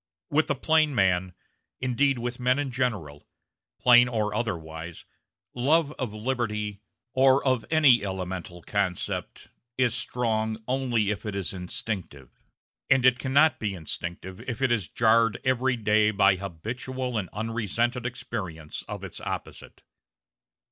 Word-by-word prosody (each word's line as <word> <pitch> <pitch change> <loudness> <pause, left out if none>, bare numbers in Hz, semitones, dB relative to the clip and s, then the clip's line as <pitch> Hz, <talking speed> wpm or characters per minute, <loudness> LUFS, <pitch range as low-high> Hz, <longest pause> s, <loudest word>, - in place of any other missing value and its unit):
With 155 +2 +3
the 145 - 0
plain 155 +1 +2
man 90 -3 +2 0.4
indeed 130 +2 +1
with 120 +1 -4
men 125 +1 +2
in 145 -2 -2
general, 105 - -3 0.5
plain 120 0 +7
or 110 -3 -1
otherwise 85 -7 -4 0.5
love 145 +5 +2
of 125 -5 -2
liberty, 105 -3 -2 0.3
or 135 +1 +4
of 130 -4 +1
any 145 -8 +5
elemental 90 -3 -5
concept, 100 -4 -2 0.3
is 125 -3 +3
strong 110 -3 -1
only 125 -5 +1
if 105 0 -4
it 105 -2 -4
is 100 -2 -3
instinctive; 90 - -5 0.6
and 130 -1 +4
it 125 -1 +5
cannot 145 +4 +3
be 100 -3 -2
instinctive 85 +2 -6
if 115 - -4
it 135 -2 +2
is 105 -7 +1
jarred 115 -1 +3
every 130 0 +2
day 105 -1 +3
by 100 -2 +4
habitual 120 +8 -5
and 100 -5 -2
unresented 115 +3 -1
experience 95 -10 -6
of - - -6
its - - -7
opposite. - - -7
115 Hz, 135 wpm, -27 LUFS, 100-125 Hz, 0.6 s, plain